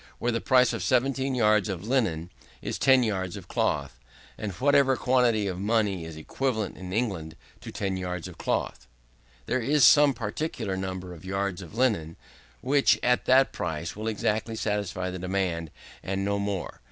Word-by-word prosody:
There, 120 Hz, -, 0 dB
the 115 Hz, -1 st, -1 dB
price 125 Hz, -1 st, +4 dB
of -, -, -3 dB
17 135 Hz, +1 st, +1 dB
yards 105 Hz, -3 st, +3 dB
of 95 Hz, +1 st, -5 dB
linen 90 Hz, -10 st, 0 dB, 0.3 s
is -, -, -4 dB
10 130 Hz, -2 st, +5 dB
yards 95 Hz, -5 st, -2 dB
of -, -, -11 dB
cloth, -, -, -1 dB, 0.4 s
or 110 Hz, -, -5 dB
whatever 135 Hz, +6 st, +3 dB
quantity 125 Hz, -5 st, +2 dB
of 95 Hz, -2 st, -3 dB
money 100 Hz, -4 st, 0 dB
is 80 Hz, -1 st, -8 dB
equivalent 110 Hz, +4 st, -2 dB
in 90 Hz, 0 st, -8 dB
England 95 Hz, -8 st, -2 dB, 0.2 s
to -, -, -9 dB
10 95 Hz, -2 st, -2 dB
yards 90 Hz, -2 st, -4 dB
of -, -, -12 dB
cloth. 60 Hz, -, -2 dB, 0.6 s
There 130 Hz, -, 0 dB
is 140 Hz, +4 st, +2 dB
some 145 Hz, 0 st, +6 dB
particular 110 Hz, -2 st, -3 dB
number 95 Hz, -1 st, -5 dB
of 80 Hz, -, -13 dB
yards 95 Hz, 0 st, -2 dB
of 90 Hz, +3 st, -11 dB
linen, 100 Hz, -11 st, +1 dB, 0.5 s
which, 140 Hz, +2 st, +3 dB
at 125 Hz, 0 st, +2 dB
that 135 Hz, +1 st, +5 dB
price, 80 Hz, +1 st, -4 dB
will 110 Hz, +2 st, -5 dB
exactly 110 Hz, +1 st, -1 dB
satisfy 100 Hz, -4 st, -2 dB
the 90 Hz, -, -6 dB
demand, 90 Hz, -3 st, -2 dB, 0.3 s
and 95 Hz, +1 st, -2 dB
no 100 Hz, 0 st, 0 dB
more. 100 Hz, -2 st, -3 dB
105 Hz, 170 wpm, -27 LUFS, 95-125 Hz, 0.6 s, some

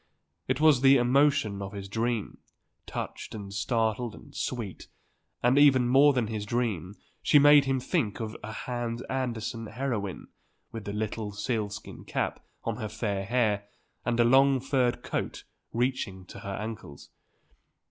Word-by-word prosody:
It 130 Hz, +1 st, 0 dB
was 155 Hz, -5 st, +5 dB
the 135 Hz, 0 st, +7 dB
emotion 125 Hz, -5 st, +3 dB
of 100 Hz, +1 st, -6 dB
his 100 Hz, -1 st, -6 dB
dream, 115 Hz, +1 st, -2 dB, 0.5 s
touched -, -, -5 dB
and 100 Hz, -2 st, -7 dB
startled 110 Hz, +2 st, 0 dB
and -, -, -15 dB
sweet, 115 Hz, -7 st, -4 dB, 0.6 s
and 125 Hz, +3 st, +5 dB
even 130 Hz, -4 st, +6 dB
more 135 Hz, +4 st, +6 dB
than 125 Hz, -4 st, +1 dB
in 110 Hz, -, -5 dB
his 105 Hz, -1 st, -2 dB
dream 105 Hz, -6 st, -1 dB, 0.3 s
she -, -, +5 dB
made 145 Hz, 0 st, +7 dB
him 135 Hz, -1 st, +1 dB
think 105 Hz, -4 st, -1 dB
of 110 Hz, -1 st, -4 dB
a 110 Hz, -, -5 dB
Hans 120 Hz, +1 st, -4 dB
Andersen 115 Hz, -3 st, -3 dB
heroine 110 Hz, -5 st, -3 dB, 0.4 s
with 110 Hz, -2 st, -7 dB
the 100 Hz, -, -3 dB
little 105 Hz, 0 st, -3 dB
sealskin 105 Hz, -1 st, -4 dB
cap -, -, -2 dB, 0.2 s
on -, -, -2 dB
her 110 Hz, -, -4 dB
fair 100 Hz, -2 st, -2 dB
hair, 105 Hz, -3 st, +1 dB, 0.4 s
and 120 Hz, -1 st, 0 dB
a -, -, +7 dB
long 135 Hz, +2 st, +5 dB
furred 130 Hz, -2 st, 0 dB
coat -, -, -3 dB, 0.3 s
reaching 115 Hz, -6 st, -1 dB
to -, -, -10 dB
her 100 Hz, -1 st, -5 dB
ankles. 105 Hz, -10 st, -8 dB
115 Hz, 155 wpm, -28 LUFS, 105-130 Hz, 0.6 s, the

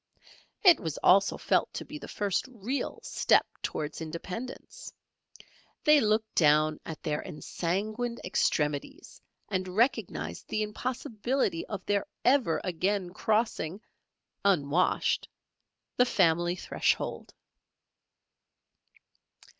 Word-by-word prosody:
It 355 Hz, -6 st, +8 dB
was 160 Hz, -3 st, -4 dB
also 195 Hz, +2 st, +5 dB
felt -, -, +1 dB
to -, -, -4 dB
be 300 Hz, -, -8 dB
the -, -, -9 dB
first 200 Hz, -3 st, -1 dB
real 255 Hz, +2 st, -4 dB
step -, -, +3 dB, 0.2 s
towards 150 Hz, +2 st, -4 dB
independence; 210 Hz, -, -7 dB, 0.9 s
they 300 Hz, -2 st, +6 dB
looked 215 Hz, 0 st, +1 dB
down 155 Hz, -1 st, +4 dB
at 160 Hz, -, -7 dB
their 150 Hz, -1 st, -1 dB
ensanguined 210 Hz, +8 st, -3 dB
extremities 150 Hz, -5 st, -1 dB, 0.3 s
and 185 Hz, -1 st, -2 dB
recognized 180 Hz, -, 0 dB
the 215 Hz, -, -1 dB
impossibility 230 Hz, -2 st, -2 dB
of 200 Hz, -3 st, -6 dB
their 200 Hz, -1 st, 0 dB, 0.2 s
ever 250 Hz, -, +3 dB
again 185 Hz, +1 st, -1 dB
crossing 210 Hz, -4 st, 0 dB, 0.6 s
(unwashed) 175 Hz, -3 st, +2 dB, 0.7 s
the 250 Hz, -, +6 dB
family 175 Hz, -4 st, +2 dB
threshold. -, -, -1 dB
195 Hz, 100 wpm, -29 LUFS, 165-230 Hz, 0.9 s, It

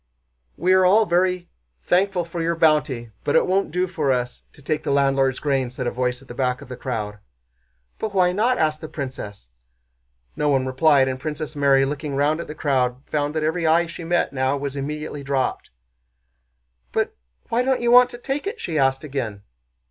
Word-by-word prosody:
"We 185 Hz, +3 st, +3 dB
are 185 Hz, 0 st, +5 dB
all 205 Hz, +4 st, +5 dB
very 180 Hz, 0 st, +1 dB, 0.4 s
thankful 185 Hz, -1 st, +1 dB
for 170 Hz, 0 st, -5 dB
your 170 Hz, +1 st, 0 dB
bounty, 150 Hz, -8 st, +2 dB
but 145 Hz, -, 0 dB
it -, -, +5 dB
won't 195 Hz, +2 st, +1 dB
do 180 Hz, +3 st, 0 dB
for 155 Hz, -6 st, -1 dB
us 125 Hz, -1 st, -2 dB
to -, -, -18 dB
take 150 Hz, +2 st, -2 dB
the 155 Hz, -, -4 dB
landlord's 135 Hz, -2 st, +2 dB
grain," 135 Hz, -4 st, 0 dB
said 125 Hz, +1 st, -5 dB
a 120 Hz, -, 0 dB
voice 125 Hz, +1 st, -2 dB
at -, -, -20 dB
the 120 Hz, -, -8 dB
back 125 Hz, 0 st, -1 dB
of -, -, -12 dB
the 125 Hz, -, -5 dB
crowd. 105 Hz, -5 st, -4 dB, 0.8 s
"But 215 Hz, -2 st, -4 dB
why 180 Hz, -1 st, +4 dB
not?" 230 Hz, +7 st, +1 dB
asked 155 Hz, -1 st, 0 dB
the 155 Hz, -, -6 dB
princess. 105 Hz, -, -7 dB, 0.8 s
No 150 Hz, -, 0 dB
one 135 Hz, -2 st, +2 dB
replied 135 Hz, +1 st, +4 dB
and 130 Hz, 0 st, -3 dB
Princess 155 Hz, +1 st, -5 dB
Mary, 140 Hz, -1 st, +4 dB
looking 140 Hz, 0 st, -4 dB
round 145 Hz, +3 st, +1 dB
at 170 Hz, -, -5 dB
the 150 Hz, -, -7 dB
crowd, 130 Hz, -3 st, 0 dB
found 150 Hz, 0 st, -2 dB
that 155 Hz, -, 0 dB
every 160 Hz, +2 st, 0 dB
eye 165 Hz, +2 st, +4 dB
she 170 Hz, +1 st, -8 dB
met 175 Hz, -3 st, 0 dB
now 130 Hz, +1 st, 0 dB
was 140 Hz, 0 st, -4 dB
immediately 150 Hz, +1 st, -4 dB
dropped. 135 Hz, -1 st, -2 dB, 1.2 s
"But -, -, -1 dB, 0.3 s
why 235 Hz, -, +2 dB
don't 260 Hz, 0 st, +1 dB
you 240 Hz, 0 st, +2 dB
want 250 Hz, 0 st, +8 dB
to 240 Hz, -, -9 dB
take 275 Hz, +8 st, -3 dB
it?" 445 Hz, +3 st, -4 dB
she 160 Hz, -3 st, -2 dB
asked 135 Hz, +1 st, +2 dB
again. 120 Hz, -9 st, -4 dB
150 Hz, 200 wpm, -22 LUFS, 130-175 Hz, 1.2 s, want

